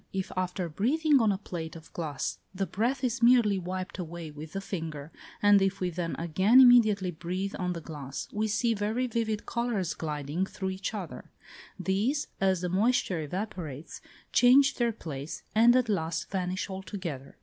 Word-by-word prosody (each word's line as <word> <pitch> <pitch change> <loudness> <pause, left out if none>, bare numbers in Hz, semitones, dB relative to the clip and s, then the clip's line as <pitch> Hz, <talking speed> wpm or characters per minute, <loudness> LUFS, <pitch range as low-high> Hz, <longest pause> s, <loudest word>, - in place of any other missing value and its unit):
If 190 -1 -3
after 185 0 -2
breathing 275 - +2
on 220 -2 +4
a 195 - -1
plate 170 -5 -6
of 165 -1 -13
glass, 150 -5 -3 0.2
the 195 +1 0
breath 240 - -1
is 245 0 -1
merely 235 -5 +5
wiped 185 +1 -5
away 170 -2 -6
with 150 +1 -10
the 195 - -2
finger, 160 -6 -5 0.3
and 205 -1 +6
if 195 0 +1
we 180 -1 -1
then 170 0 -3
again 185 +9 +4
immediately 215 -7 +6
breathe 180 +4 -4
on 180 -1 -1
the 170 - -6
glass, 145 -4 -6
we 215 +1 0
see 230 +2 +1
very 215 +4 -1
vivid 225 -3 -2
colours 235 -7 -1
gliding 150 +3 -3
through 190 -1 -4
each 190 +3 -4
other; 190 -5 -7 0.5
these, 205 +10 0
as 190 -2 +2
the 180 - -1
moisture 190 -3 +1
evaporates, 165 -3 -6 0.3
change 270 +3 +6
their 235 -1 +2
place, 150 -8 -7
and 235 +3 +6
at 255 -1 +3
last 165 -6 -2
vanish 185 -1 -2
altogether. 185 -7 -6
190 Hz, 170 wpm, -29 LUFS, 170-220 Hz, 0.5 s, and